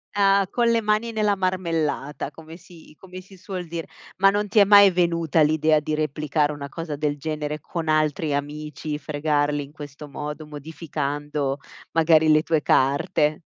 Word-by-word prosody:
Ah, 195 -1 +3
con 240 -1 +1
le 230 -1 +2
mani 215 +2 0
nella 210 -2 +1
marmellata, 165 -7 -2
come 160 +1 -12
si 165 -3 -17
come 185 -1 -10
si 190 +1 -17
suol 185 -2 -6
dire. 165 0 -5 0.3
Ma 195 +1 +5
non 205 +1 -1
ti 220 - -4
è 205 - +9
mai 200 0 +8
venuta 170 -3 +1
l'idea 155 0 +3
di 150 +1 -4
replicare 150 0 0
una 145 -1 -6
cosa 160 0 -6
del 145 0 -1
genere 150 0 -4
con 165 -1 -5
altri 155 -1 +1
amici, 150 +1 -4
fregarli 145 0 -1
in 140 - -13
questo 145 -1 -10
modo, 150 +2 -6
modificando 145 -2 -4 0.3
magari 160 -1 +4
le 155 - +5
tue 160 -1 0
carte? 145 +3 +2
155 Hz, 165 wpm, -23 LUFS, 150-180 Hz, 0.3 s, è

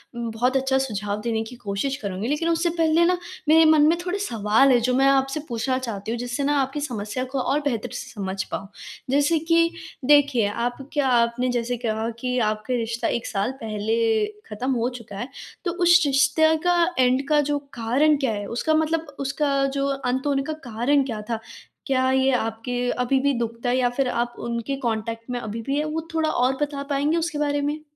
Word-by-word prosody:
म 235 -1 -3
बहुत 250 +4 +1
अच्छा 265 0 +1
सुझाव 210 -5 -2
देने 225 -1 -1
की 245 +3 -10
कोशिश 240 +3 -2
करूँगी। 200 -3 -4
लेकिन 300 +5 0
उससे 335 +1 +1
पहले 325 +1 +4
ना 360 +1 +2 0.3
मेरे 320 +1 +7
मन 305 -1 +5
में 335 - +3
थोड़े 365 +2 -1
सवाल 230 - +3
हैं 245 - +5
जो 250 - +2
मैं 270 +1 +4
आपसे 270 +2 +2
पूछना 245 +2 -1
चाहती 225 -5 -4
हूँ 235 - -2
जिससे 245 +3 -3
ना 290 +1 +2
आपकी 270 +2 -2
समस्या 240 -2 -3
को 275 - -1
और 280 +3 +1
बेहतर 235 -6 -1
से - - -6
समझ 190 -3 -3
पाऊँ। 195 - -4 0.4
जैसे 290 +4 +3
कि 335 +1 +3 0.3
देखिए 285 -6 +4 0.2
आप 245 - -2 0.2
क्या 290 -3 +1
आपने 240 +1 +2
जैसे 245 0 -1
कहा 220 +1 -1
कि 250 +1 -1
आपका 215 +4 -4
रिश्ता 230 0 -2
1 235 - -2
साल 205 +3 -1
पहले 220 +1 +1 0.2
ख़त्म 245 +5 -2
हो 240 0 0
चुका 205 -3 -10
है, 240 - -4 0.4
तो 345 - +1
उस 350 +1 +7
रिश्ते 280 +3 +3
का 355 - +4 0.2
एंड 255 +2 +3
का 300 -1 +4
जो 290 0 0 0.2
कारण 265 +6 +2
क्या 270 -5 0
है? 205 -1 -4
उसका 280 +7 0
मतलब 315 -1 0
उसका 275 0 0
जो 275 0 +1
अंत 265 0 -1
होने 275 -1 +1
का 310 - -3 0.2
कारण 250 +6 +2
क्या 220 -5 -4
था? 230 -1 -1 0.5
क्या 260 -1 +2
ये 265 0 +3
आपके 225 +1 -2 0.2
अभी-भी 270 +3 +2
दुखता 235 +1 -2
है? 250 - +2
या 250 -1 +2
फ़िर 255 +2 -1
आप 240 0 -1
उनके 235 +3 -3
कॉन्टैक्ट 230 -1 -3
में 245 - -2
अभी-भी 230 +5 -3
हैं, 300 - 0
वो 315 +1 -4
थोड़ा 320 -1 +1
और 260 -1 +1
बता 285 -1 -2
पाएँगे 290 +4 +1
उसके 330 -2 -2
बारे 290 -1 0
में? 295 +2 -2
260 Hz, 200 wpm, -24 LUFS, 230-290 Hz, 0.5 s, मेरे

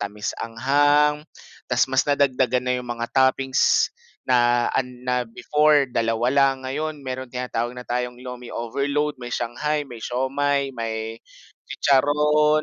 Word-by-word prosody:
tamis-anghang, 140 +8 +1 0.5
tapos 125 0 +3
mas 130 - +4
nadagdagan 130 -3 +2
na 125 - +2
'yong 125 -1 -7
mga 120 0 -3
toppings 130 0 +3 0.3
na 120 -1 +2
an 130 - 0 0.2
na 125 -1 -1
before 150 +4 +2
2 115 +1 0
lang, 135 0 +4
ngayon 150 +3 -4
meron 130 0 -5
tinatawag 125 -1 -3
na 125 - -7
tayong 125 0 -4
lomi 125 -1 -8
overload, 140 +5 -2
may 120 -1 -5
shanghai, 150 +6 -2
may 125 -5 -10
siomai, 135 +4 -1
may 115 -2 -5 0.5
chicharon, 150 +2 +3
130 Hz, 130 wpm, -23 LUFS, 120-145 Hz, 0.5 s, mas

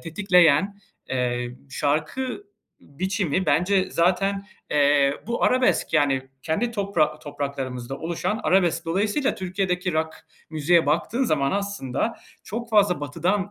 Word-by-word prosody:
tetikleyen, 180 +1 +3 0.3
eee, 125 -1 -1 0.2
şarkı 155 - -2 0.4
biçimi 185 +2 -2
bence 185 +6 +2
zaten, 195 +3 +1 0.2
eee, 145 -1 +3
bu 235 +1 -2
arabesk, 255 0 +2
yani, 145 -3 +2 0.2
kendi 200 +11 -1
topra 185 -8 0
topraklarımızda 135 -3 -5
oluşan 170 +7 -2
arabesk. 175 -3 +2
Dolayısıyla 205 - 0
Türkiye'deki 185 -1 -2
rock 160 0 -1 0.4
müziğe 160 +1 +3
baktığın 205 - +1
zaman, 140 - +1
aslında, 200 - -2 0.3
çok 235 +3 -5
fazla 205 -7 +3
Batı'dan 175 +7 -1
175 Hz, 110 wpm, -24 LUFS, 145-200 Hz, 0.4 s, tetikleyen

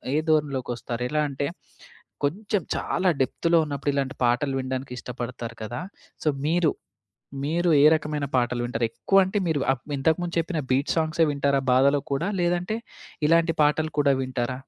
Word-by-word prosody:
ఏ - - +3
ధోరణిలోకొస్తారు. 130 -5 -1
ఎలా 150 0 +1
అంటే 140 +1 -3 0.8
కొంచెం 205 +7 0
చాలా 185 0 0
డెప్త్‌లో 165 +6 +2
ఉన్నప్పుడు 145 0 -2
ఇలాంటి 140 -1 -1
పాటలు 130 +3 +2
వినడానికి 130 0 -4
ఇష్టపడతారు 120 -1 -6
కదా! 120 +7 -5 0.4
సో, - - -2 0.2
మీరు 165 +1 +3 0.7
మీరు 170 +4 +1
ఏ - - +6
రకమైన 150 -2 -2
పాటలు 120 -1 +1
వింటారు? 120 -1 -1
ఎక్కువ 195 - +1
అంటే 190 +3 -2
మీరు 160 -3 +1 0.4
ఇంతకుముందు 165 +5 0
చెప్పిన 165 -1 -2
బీట్ 140 +3 +1
సాంగ్సే 160 0 +2
వింటారా 140 -1 +1
బాధ‌లో 140 +3 +4
కూడా? 160 +7 0
లేదంటే 175 +5 0 0.5
ఇలాంటి 165 0 +3
పాటలు 155 +1 +1
కూడా 140 -1 +4
వింటారా? 130 0 -3
145 Hz, 145 wpm, -25 LUFS, 130-165 Hz, 0.8 s, ఏ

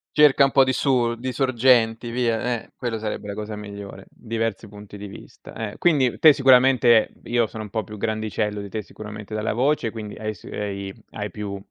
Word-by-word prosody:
Cerca 150 -2 +6
un 135 - +3
po' 135 0 +5
di 130 - +1
su 125 -4 +1
di 130 +2 -4
sorgenti 120 -3 +2
via, 120 -1 -1
eh, - - -22
quello 120 -3 -3
sarebbe 105 -1 -4
la - - -3
cosa 105 +1 -5
migliore, 100 -2 -9
diversi 115 -2 -4
punti 105 0 -12
di 100 0 -7
vista, 100 - -13
eh. 105 -2 -5
Quindi 140 -8 +2
te 155 -2 +8
sicuramente 125 -4 +5
io 120 -1 +1
sono 110 0 -7
un 105 - -9
po' 110 -1 -3
più 105 - -9
grandicello 110 -1 -2
di 100 - -6
te 110 +2 -4
sicuramente 105 +1 -9
dalla 110 0 -1
voce, 130 +1 +1
quindi 110 -2 -7
hai 110 0 -3
s 100 - -18
hai 100 -1 -4 0.2
hai 105 -1 -5
più 100 -2 -5
110 Hz, 200 wpm, -23 LUFS, 105-125 Hz, 0.2 s, te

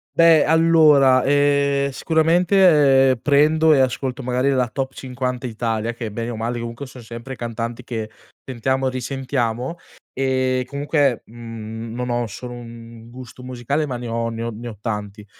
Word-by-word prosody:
Beh, 165 -3 +6
allora, 155 -5 +5
ehm, 140 0 +2
sicuramente 160 -5 +4
prendo 155 +2 +4
e 135 - +3
ascolto 130 0 -1
magari 125 +2 0
la 130 -3 +1
top 135 +3 -4
50 125 -1 -4
Italia, 115 0 -2
che 115 -3 -6
bene 115 +2 -4
o - - -5
male 115 +2 -3
comunque 120 +4 -6
son 125 -2 -12
sempre 120 +3 -8
cantanti 115 +1 -5
che 110 -3 -5 0.3
sentiamo 130 +1 -1
e - - +1
risentiamo, 130 +1 -3 0.4
ehm, 130 -1 0
comunque, 140 -2 0
mhmm, 115 -1 -8
non 125 0 -4
ho 120 0 0
solo 120 +4 -8
1 115 -1 -11
gusto 125 0 -11
musicale, 130 +4 -2
ma 125 -3 -4
ne 120 - -7
ho 115 0 -2
ne 115 0 -6
ho 115 - -2
ne 115 +2 -8
ho 110 -4 -8
tanti; 105 -2 -5
125 Hz, 160 wpm, -21 LUFS, 115-140 Hz, 0.4 s, Beh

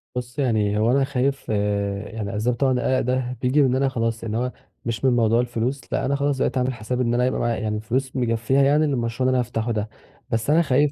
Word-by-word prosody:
بُص 125 +2 -5
يعني 110 -6 +1
هو 110 +3 +3
أنا 135 +1 +3
خايف 135 0 -1
يعني 100 0 -2
أسباب 115 +4 0
طبعًا 135 +1 +2
القلق 130 +1 +1
ده 125 0 -1
بييجي 130 +4 +3
من 135 - +4
إن 125 - +1
أنا 135 +1 +2
خلاص 115 -2 -2
اللي 110 -1 -2
هو 125 +1 -1 0.3
مش 115 +2 -2
من 130 - +5
موضوع 115 -1 +3
الفلوس، 125 +2 -2
لأ - - 0
أنا 140 +2 +1
خلاص 140 0 0
بقيت 130 - 0
أعمل 130 +1 +1
حساب 120 +2 -3
إن 120 -1 +1
أنا 125 +1 +2
يبقى 130 - 0
معايا 120 -1 0
يعني 105 -1 -1
الفلوس 125 +5 -2
مكفيها 120 +1 +1
يعني 150 +3 +4
للمشروع 125 -2 -1
اللي - - +4
أنا - - +3
هافتحه 120 -1 -2
ده، 110 -1 -2 0.4
بس 115 +3 -1
أنا 160 +3 +5
خايف 145 -1 +2
125 Hz, 235 wpm, -23 LUFS, 110-130 Hz, 0.4 s, من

